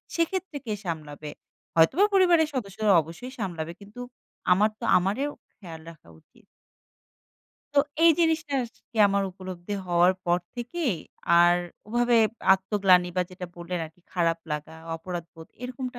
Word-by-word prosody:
সেক্ষেত্রে 340 -1 -1
কে 220 - -2
সামলাবে? 150 -3 -5 0.4
হয়তোবা 165 - +5
পরিবারের 350 -5 +5
সদস্যরা 215 -4 0
অবশ্যই 170 - -9
সামলাবে 170 -5 -4
কিন্তু 205 +5 -10 0.5
আমার 205 +4 +5
তো 235 - -4
আমারেও 205 +11 0 0.3
খেয়াল 165 -5 -10
রাখা 155 - -19
উচিত।" - - -26 1.3
তো - - +8 0.2
এই 335 - +9
জিনিসটা 320 -3 +1
আর 235 - -11 0.2
কি 230 - -15
আমার 200 0 +1
উপলব্ধি 185 0 -8 0.2
হওয়ার 175 +1 +4
পর 175 0 +2 0.2
থেকেই 245 - -2 0.5
আর 175 0 +6 0.3
ওভাবে 240 +1 +2 0.4
আত্মগ্লানি 190 -2 +3
বা 180 - +3
যেটা 180 0 -7
বললেন 175 +1 -4
আর 155 - -9
কি - - -28
খারাপ 170 -2 +1
লাগা, 150 +1 -5 0.2
অপরাধবোধ 165 -1 -8 0.2
এরকমটা 250 0 -5
190 Hz, 140 wpm, -26 LUFS, 175-245 Hz, 1.3 s, এই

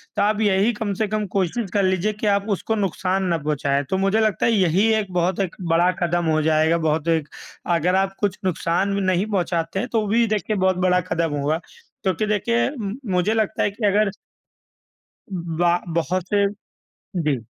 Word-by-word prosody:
तो 205 - +1
आप 210 +1 +2
यही 205 +2 +3
कम 210 -1 -3
से 215 +2 -1
कम 215 0 -1
कोशिश 195 +3 0
कर 200 -1 +2
लीजिए 190 +3 +1
कि 210 +1 -3
आप 200 0 +2
उसको 215 +3 -1
नुकसान 190 -1 -1
ना 170 -2 +1
पहुँचाए। 145 -2 0
तो 190 - 0
मुझे 195 +3 +2
लगता 215 -5 +1
है 230 - +3
यही 195 0 +3
एक 210 -4 -1
बहुत 180 +2 0
एक 190 -3 -2
बड़ा 170 +1 +3
कदम 175 0 +1
हो 155 0 +2
जाएगा, 160 +2 +3
बहुत 160 0 0
एक 160 -3 +1 0.5
अगर 180 +3 +1
आप 195 0 +1
कुछ 205 -2 0
नुकसान 185 +2 0
भी 200 - 0
नहीं 185 +1 +1
पहुँचाते 180 -3 -1
हैं, 245 - -2
तो 225 -4 0
भी 230 +3 +3
देखिए 215 0 -1
बहुत 185 -1 +2
बड़ा 180 0 +3
कदम 165 -3 0
होगा 150 +3 0 0.5
क्योंकि 190 +3 +1
देखिए, 235 +4 +1
म 215 -8 -5 0.2
मुझे 180 +4 +2
लगता 220 -2 0
है - - +2
कि 210 +1 -3
अगर 205 +1 +3 1.2
ब 170 -4 -5
बा 175 -1 +4 0.2
बहुत 170 +2 0
से 200 -1 +4 0.8
जी। 135 -7 -1
190 Hz, 195 wpm, -22 LUFS, 170-210 Hz, 1.2 s, बा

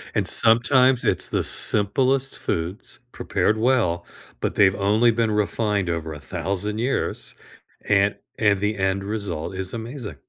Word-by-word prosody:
And - - +1
sometimes 125 +3 +4
it's - - -1
the - - -1
simplest 130 +6 +3
foods, 85 +4 -5
prepared 110 - -1
well, 110 -8 0 0.3
but - - -3
they've 95 -1 +3
only 105 +4 +2
been 115 -1 -1
refined 105 -2 -1
over 80 -2 -4
1,000 100 +7 -4
years, 125 +4 -3 0.5
and 100 0 +2 0.2
and 105 -3 +1
the 105 +1 -2
end 95 0 -1
result 100 -6 -5
is 95 +1 -4
amazing. 115 - -7
105 Hz, 135 wpm, -22 LUFS, 95-115 Hz, 0.5 s, sometimes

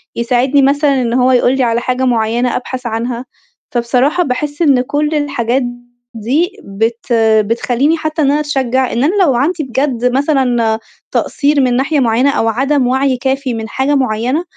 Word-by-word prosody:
يساعدني 250 +4 +1
مثلًا 280 0 +2
إن 235 -1 -1
هو 255 +1 +3
يقول 250 +1 +2
لي 265 - +1
على 235 0 0
حاجة 255 +1 -1
معيّنة 235 0 0
أبحث 255 0 -5
عنها، 235 +2 -3 0.5
فبصراحة 250 +8 +1
باحس 290 +2 -3
إن 275 -6 +4
كل 295 +3 -1
الحاجات 270 -3 -1 0.5
دي 275 +11 0
بت 225 +4 -2 0.3
بتخلّيني 245 +7 0
حتّى 310 0 -3
إن 280 -1 +3
أنا 295 - +1
أتشجّع 265 -4 -1
إن 240 +3 0
أنا 345 +8 +1
لو 275 -8 +2
عندي 305 +6 0
بجد 260 -2 -2
مثلًا 250 -6 +1 0.3
تقصير 285 0 +1
من 250 -2 +1
ناحية 275 +4 +1
معيّنة 245 +2 +2
أو 225 - 0
عدم 265 +3 +1
وَعي 265 0 +1
كافي 265 0 -2
من 220 -1 -5
حاجة 270 +5 0
معيّنة، 255 +4 0
260 Hz, 165 wpm, -14 LUFS, 240-285 Hz, 0.5 s, إن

